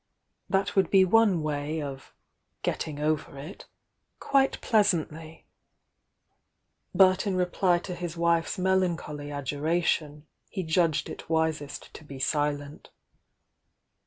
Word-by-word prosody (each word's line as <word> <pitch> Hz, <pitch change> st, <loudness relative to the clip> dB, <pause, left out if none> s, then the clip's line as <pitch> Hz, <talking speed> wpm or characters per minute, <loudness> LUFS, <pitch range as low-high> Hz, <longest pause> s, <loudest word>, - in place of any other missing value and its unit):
Tha'. 195 Hz, 0 st, +2 dB
would 195 Hz, -, +3 dB
be 190 Hz, -1 st, +6 dB
one 195 Hz, -4 st, +3 dB
way 150 Hz, +1 st, -2 dB
of 140 Hz, -2 st, -7 dB, 0.5 s
getting 150 Hz, -2 st, -3 dB
over 150 Hz, -2 st, -1 dB
it" 150 Hz, +8 st, -10 dB, 0.5 s
quite 270 Hz, -1 st, +2 dB
pleasantly,— 165 Hz, -7 st, 0 dB, 1.5 s
but 190 Hz, +1 st, +4 dB
in 195 Hz, -, 0 dB
re 180 Hz, 0 st, +2 dB
ply 180 Hz, 0 st, +2 dB
to 180 Hz, +1 st, -6 dB
his 175 Hz, -1 st, -5 dB
wife's 170 Hz, 0 st, +1 dB
melancholy 175 Hz, -6 st, 0 dB
adjuration, 150 Hz, +1 st, -1 dB, 0.2 s
he 190 Hz, -, -4 dB
judged 160 Hz, -1 st, +1 dB
it -, -, -9 dB
wisest 160 Hz, -3 st, -2 dB
to -, -, -11 dB
be 140 Hz, -2 st, -10 dB
silent. 145 Hz, +1 st, -2 dB
160 Hz, 115 wpm, -27 LUFS, 150-185 Hz, 1.5 s, be